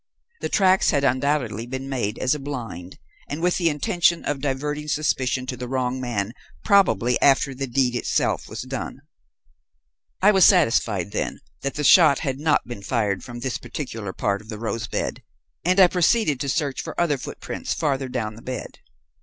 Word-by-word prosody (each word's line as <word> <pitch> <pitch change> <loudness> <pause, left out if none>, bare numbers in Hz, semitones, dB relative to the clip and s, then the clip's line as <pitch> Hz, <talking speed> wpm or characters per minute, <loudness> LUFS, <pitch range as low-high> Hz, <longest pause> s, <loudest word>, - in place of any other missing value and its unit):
The - - -3
tracks 190 -1 +4
had 140 -2 +1
undoubtedly 130 -4 0
been 130 +2 -5
made 120 -6 -2
as 130 +2 +1
a 150 - -3
blind 115 - -6 0.3
and 145 - -4
with 175 +1 +1
the 170 -3 +2
intention 170 +3 +1
of 145 -2 -2
diverting 150 +2 -2
suspicion 135 -4 0
to 130 - -4
the 125 0 -6
wrong 130 0 -1
man 115 -4 -2 0.3
probably 125 - +3
after 135 0 +4
the 135 +1 -4
deed 125 0 +1
itself - - 0
was - - -5
done. - - -6 1.2
"I 205 +2 +6
was 190 -3 +4
satisfied, 115 - +3
then, - - -3 0.2
that 140 - -3
the 150 - -2
shot 150 -2 +7
had 135 -3 -3
not 150 -4 +1
been 120 -4 -7
fired 100 -4 -1
from 120 0 -8
this 130 0 -2
particular 115 -5 -6
part 100 +2 -1
of 110 - -18
the 110 - -5
rose 115 +1 -3
bed, - - -3 0.4
and 185 +3 +2
I 190 - +10
proceeded 180 - +2
to 140 - -2
search 145 -2 -1
for - - -6
other 155 -6 +1
footprints - - -5
farther 135 -4 -1
down 110 -4 -3
the 115 - -13
bed. 130 +1 -6
130 Hz, 180 wpm, -23 LUFS, 120-150 Hz, 1.2 s, I